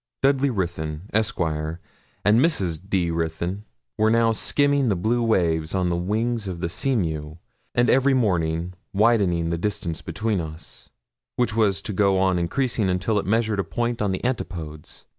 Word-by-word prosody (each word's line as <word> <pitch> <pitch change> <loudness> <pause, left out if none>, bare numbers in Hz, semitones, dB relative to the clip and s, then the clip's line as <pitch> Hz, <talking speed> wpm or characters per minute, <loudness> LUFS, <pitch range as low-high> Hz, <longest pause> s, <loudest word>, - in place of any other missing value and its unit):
Dudley 135 0 +3
Ruthyn, 85 -7 -3
Esq., 110 +1 0
and 80 -1 -1 0.6
Mrs. 100 - +1
D. 90 -4 +1
Ruthyn, 85 +5 -3 0.3
were 110 +1 +4
now 115 0 +4
skimming 140 +3 +1
the 100 - +2
blue 110 +7 0
waves 85 -8 +1
on 90 -2 +1
the 85 - 0
wings 110 +5 -1
of 90 -2 -4
the 85 -1 -2
Seamew, 80 - -1 0.4
and 120 0 +3
every 135 +1 +4
morning 85 -6 0 0.2
widened 95 -6 +2
the 85 - -1
distance 95 -5 -3
between 95 +5 -1
us, 80 -1 -10 0.5
which 120 -3 0
was 100 -3 +2
to 105 - -4
go 100 0 +3
on 95 -1 +2
increasing 110 +3 0
until 95 +4 +1
it 95 - -5
measured 110 -1 +1
a - - +2
point 120 +2 -2
on 100 -2 +1
the 95 - -3
antipodes. 80 -11 -5
95 Hz, 160 wpm, -24 LUFS, 85-115 Hz, 0.6 s, were